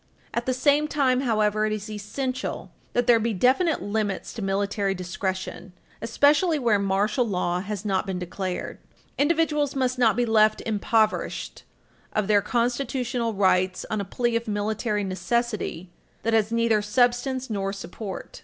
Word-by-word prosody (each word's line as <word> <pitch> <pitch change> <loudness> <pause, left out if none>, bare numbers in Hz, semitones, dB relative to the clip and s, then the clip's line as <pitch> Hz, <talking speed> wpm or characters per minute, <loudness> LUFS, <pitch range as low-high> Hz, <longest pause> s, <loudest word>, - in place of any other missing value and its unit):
At 235 +1 -2
the 255 - +2
same 290 +3 +3
time, 270 -4 +2
however, 215 -3 +1
it - - -2
is 210 0 -4
essential 250 +5 -4 0.2
that 245 - +2
there 235 -2 +5
be 225 -1 -1
definite 270 - +2
limits 205 -1 -2
to 230 - -6
military 195 0 0
discretion, 185 0 -4 0.3
especially 290 +8 +3
where 230 -7 +2
martial 200 +5 +1
law 180 -5 -1
has 205 +2 -5
not 195 0 0
been 190 -1 -2
declared. 180 +1 -4 0.4
Individuals 300 -2 +2
must 255 -1 0
not 225 -3 +4
be 245 +1 +1
left 215 -1 +4
impoverished 220 0 0 0.5
of 210 -2 0
their 205 -1 +4
constitutional 240 0 -1
rights 185 -1 +2
on 215 -1 0
a - - -2
plea 240 +4 -1
of 230 0 -1
military 210 0 -1
necessity 190 -1 -2 0.3
that 230 - 0
has 220 -1 +2
neither 230 -2 +2
substance 245 +3 +1
nor 195 -2 -1
support. 195 0 -7
215 Hz, 150 wpm, -25 LUFS, 200-245 Hz, 0.5 s, there